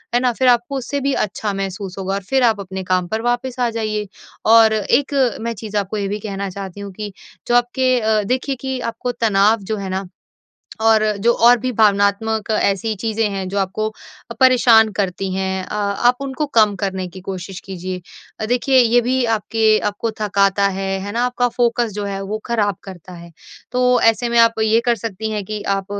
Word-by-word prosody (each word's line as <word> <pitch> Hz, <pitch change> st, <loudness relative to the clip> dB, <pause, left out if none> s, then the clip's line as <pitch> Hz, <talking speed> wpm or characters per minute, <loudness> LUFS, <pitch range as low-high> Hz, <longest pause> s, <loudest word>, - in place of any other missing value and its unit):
है -, -, +4 dB
ना? 250 Hz, -1 st, +2 dB
फिर 260 Hz, +2 st, +1 dB, 0.2 s
आपको 275 Hz, +3 st, -5 dB
उससे 280 Hz, +2 st, -3 dB
भी 275 Hz, 0 st, 0 dB
अच्छा 210 Hz, -1 st, -2 dB
महसूस 195 Hz, -1 st, -5 dB
होगा 195 Hz, 0 st, -2 dB
और 200 Hz, -, -4 dB
फ़िर 265 Hz, -1 st, +2 dB
आप 225 Hz, -3 st, +3 dB
अपने 190 Hz, -1 st, -6 dB
काम 185 Hz, -1 st, 0 dB
पर 220 Hz, +4 st, -2 dB
वापस 245 Hz, +1 st, -2 dB
आ 245 Hz, -1 st, +2 dB
जाइए। 215 Hz, -2 st, -3 dB, 0.4 s
और 225 Hz, 0 st, +6 dB
एक 245 Hz, +7 st, +1 dB, 0.3 s
मैं 230 Hz, +1 st, -2 dB
चीज़ 210 Hz, 0 st, -5 dB
आपको 205 Hz, +1 st, -2 dB
ये 200 Hz, -1 st, -2 dB
भी 205 Hz, +2 st, -3 dB
कहना 200 Hz, -1 st, -4 dB
चाहती 195 Hz, 0 st, -8 dB
हूँ 200 Hz, -1 st, -7 dB
कि 210 Hz, +1 st, -6 dB, 0.4 s
जो 240 Hz, -, +2 dB
आपके 250 Hz, +1 st, +2 dB
अ, 215 Hz, -1 st, +2 dB
देखिए 255 Hz, +5 st, -1 dB
कि 265 Hz, -1 st, -3 dB
आपको 245 Hz, +2 st, -4 dB
तनाव 220 Hz, -1 st, +2 dB
जो -, -, -2 dB
है 195 Hz, -1 st, -5 dB
ना 190 Hz, 0 st, -3 dB, 0.8 s
और 220 Hz, -1 st, +4 dB, 0.2 s
जो 235 Hz, -, +5 dB
और 245 Hz, +1 st, +8 dB
भी 255 Hz, +3 st, -2 dB
भावनात्मक 210 Hz, 0 st, +2 dB
ऐसी 215 Hz, 0 st, 0 dB
चीज़ें 225 Hz, -1 st, 0 dB
हैं 195 Hz, -1 st, -4 dB
जो 200 Hz, +2 st, -2 dB
आपको 195 Hz, +2 st, -1 dB, 0.4 s
अ, -, -, -5 dB
परेशान 240 Hz, -4 st, +6 dB
करती 195 Hz, -1 st, -2 dB
हैं 190 Hz, 0 st, -2 dB
अ, -, -, -7 dB
आप 210 Hz, +4 st, +1 dB
उनको 275 Hz, +2 st, -3 dB
कम 220 Hz, -6 st, +3 dB
करने 190 Hz, -2 st, -3 dB
की 185 Hz, +2 st, -11 dB
कोशिश 185 Hz, 0 st, -7 dB
कीजिए। 185 Hz, -1 st, -6 dB, 0.4 s
अ, -, -, -2 dB
देखिए 250 Hz, +3 st, +2 dB
ये 240 Hz, -1 st, +5 dB
भी 250 Hz, +1 st, 0 dB
आपके 220 Hz, 0 st, +2 dB
आपको 205 Hz, +3 st, -3 dB
थकाता 200 Hz, -1 st, +2 dB
है। 195 Hz, 0 st, -2 dB
है 200 Hz, +1 st, -6 dB
ना? 235 Hz, +2 st, 0 dB
आपका 245 Hz, 0 st, 0 dB
फ़ोकस 240 Hz, -1 st, 0 dB
जो 205 Hz, +1 st, -4 dB
है 195 Hz, -1 st, -4 dB
वो 205 Hz, +2 st, -4 dB
ख़राब 210 Hz, -5 st, 0 dB
करता 185 Hz, -2 st, -11 dB
है। 170 Hz, -1 st, -11 dB, 0.4 s
तो 250 Hz, 0 st, +3 dB
ऐसे 225 Hz, +2 st, +3 dB
में 235 Hz, 0 st, +1 dB
आप 230 Hz, -1 st, +4 dB
ये 220 Hz, +1 st, +3 dB
कर 240 Hz, -, +4 dB
सकती 220 Hz, 0 st, -5 dB
हैं 210 Hz, -2 st, -3 dB
कि 210 Hz, +1 st, -5 dB
आप 195 Hz, -1 st, -5 dB
215 Hz, 205 wpm, -19 LUFS, 195-235 Hz, 0.8 s, और